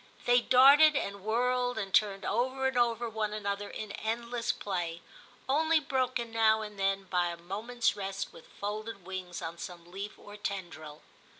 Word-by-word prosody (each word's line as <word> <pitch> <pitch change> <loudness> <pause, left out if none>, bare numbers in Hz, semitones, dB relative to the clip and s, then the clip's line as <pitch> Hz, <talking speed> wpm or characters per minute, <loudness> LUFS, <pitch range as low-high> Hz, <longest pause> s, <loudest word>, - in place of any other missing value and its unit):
They 245 0 +5
darted 280 +5 +7
and 200 -7 -2
whirled 245 +2 +1
and 195 -3 -4
turned 200 -2 +3
over 260 +5 0
and 265 0 +1
over 240 -1 +2
one 215 -1 -2
another 200 -1 -3
in 215 -2 -6
endless 235 +2 -2
play, 175 -7 -4 0.4
only 315 +4 +3
broken 255 -4 -1
now 220 -1 +3
and 210 -2 -9
then 195 0 +1
by 180 -2 0
a 170 0 -4
moment's 215 +8 -1
rest 195 0 -4
with 160 - -14
folded 210 -1 -5
wings 185 -2 -6
on 165 +1 -6
some 175 -1 -8
leaf 200 +3 -6
or 205 0 -12
tendril. 170 -7 -6
215 Hz, 165 wpm, -30 LUFS, 195-245 Hz, 0.4 s, darted